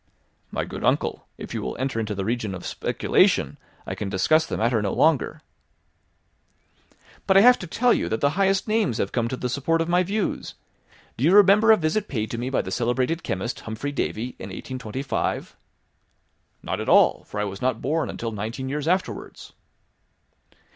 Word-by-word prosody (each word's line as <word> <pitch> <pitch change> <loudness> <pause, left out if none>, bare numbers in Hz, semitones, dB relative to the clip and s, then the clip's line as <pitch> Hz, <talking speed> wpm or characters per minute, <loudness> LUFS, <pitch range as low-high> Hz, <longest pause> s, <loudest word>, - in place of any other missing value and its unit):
"My - - -3
good - - -7
uncle, - - 0
if - - -8
you - - -3
will - - -4
enter 130 -3 -2
into 105 -2 -3
the 95 - -3
legion 110 -2 -2
of 90 - -9
speculation, - - +1 0.3
I - - -4
can 100 - -4
discuss 155 - +2
the - - -3
matter 115 -1 +1
no 100 -2 -1
longer." 155 -5 +1 1.8
"But 190 - +5
I - - +8
have 245 +3 +7
to 180 - -7
tell 240 +8 +2
you - - -1
that 110 - -1
the 140 - +2
highest 195 +4 +1
names 215 - +1
have 100 - -1
come 120 -2 0
to 130 - -4
the 125 - -2
support 140 +6 0
of 165 - 0
my 175 +1 +3
views. 200 +3 -2 0.6
Do 120 - -3
you 165 +5 +4
remember 205 +2 +7
a 220 - +7
visit 175 +6 -1
paid 110 -5 -3
to 115 - -4
me 125 +2 -2
by 135 - 0
the 95 - -6
celebrated 125 - 0
chemist, 95 +6 -3
Humphry 110 +6 -5
Davy, 125 -4 -2
in 95 - -7
1825?" 130 +5 -4 1.1
"Not - - -3
at - - -3
all, - - +5
for 105 - -6
I - - +1
was 100 -1 -5
not 125 -3 0
born 155 +3 -1
until 115 -1 -4
nineteen 115 +5 -5
years 150 +2 -3
afterwards." 185 +2 -2
130 Hz, 190 wpm, -24 LUFS, 110-170 Hz, 1.8 s, I